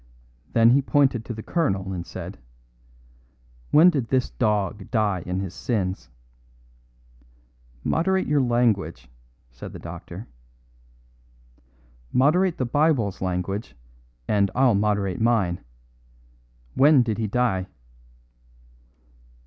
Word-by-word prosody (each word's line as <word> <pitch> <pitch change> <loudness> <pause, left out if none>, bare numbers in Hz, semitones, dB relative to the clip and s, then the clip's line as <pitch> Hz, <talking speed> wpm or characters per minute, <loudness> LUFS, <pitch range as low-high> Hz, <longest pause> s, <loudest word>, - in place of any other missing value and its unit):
Then 115 0 +5
he 135 +3 +4
pointed 135 -4 +2
to 120 - -5
the 110 - -8
colonel 95 - -1
and 85 -1 -6
said: - - -8 1.3
"When 170 +4 +6
did 135 -8 -2
this 130 0 0
dog 105 -4 -1
die 105 -5 0
in 90 +1 -2
his 95 -2 -5
sins?" 95 - -3 1.7
"Moderate 190 +3 +1
your 145 -1 +2
language," 115 - 0 0.4
said - - -10
the - - -7
doctor. 95 +7 -9 1.8
"Moderate 170 +7 +3
the 130 - -1
Bible's 125 - +1
language, 95 +3 -3 0.5
and 100 -2 +2
I'll 130 -2 +4
moderate 100 -1 0
mine. 105 -7 +1 1.1
When 140 - +5
did 115 -2 -3
he 110 - -1
die?" 100 -5 0
110 Hz, 105 wpm, -24 LUFS, 95-130 Hz, 1.8 s, When